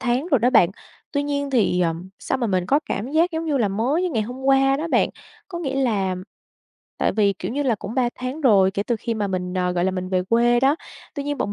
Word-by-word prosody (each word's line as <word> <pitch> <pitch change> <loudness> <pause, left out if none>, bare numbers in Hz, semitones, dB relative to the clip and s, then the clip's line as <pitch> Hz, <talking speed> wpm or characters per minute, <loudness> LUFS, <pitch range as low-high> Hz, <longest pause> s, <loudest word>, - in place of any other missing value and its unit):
tháng 255 +5 0
rồi 275 - +5
đó 245 +3 +2
bạn. 190 -8 +5 0.4
Tuy 285 - 0
nhiên 285 -1 -2
thì, 215 -8 +2
ờm, 170 +1 -1
sao - - -2
mà 240 - 0
mình 185 -3 0
có 285 +7 +3
cảm 225 +7 -3
giác 335 +3 +3
giống 325 0 -3
như 300 -3 0
là 215 -5 +2
mới 245 - 0
như 365 - 0
ngày 225 -6 0
hôm 250 +5 -7
qua 270 0 +4
đó 325 +3 -3
bạn. - - +3 0.4
Có 345 - -5
nghĩa 275 -6 -3
là 195 -6 0 0.8
tại - - +1
vì, 200 -1 +2
kiểu 190 +3 -6
như 290 +2 -1
là, 250 -5 +2
cũng 205 +3 -7
3 255 -2 +2
tháng 255 +5 -5
rồi, 200 -8 +5
kể 200 +1 -2
từ 235 +1 -1
khi 230 +1 -3
mà 210 -2 -1
mình, 180 -1 -3
ờ, 180 -1 0
gọi 175 0 0
là, 190 - +2
mình 185 0 -4
về 185 -1 +1
quê 240 +1 +3
đó, 275 +4 +3 0.4
tuy 285 - -3
nhiên 290 -1 -3
bọn 205 - -1
240 Hz, 265 wpm, -22 LUFS, 195-275 Hz, 0.8 s, rồi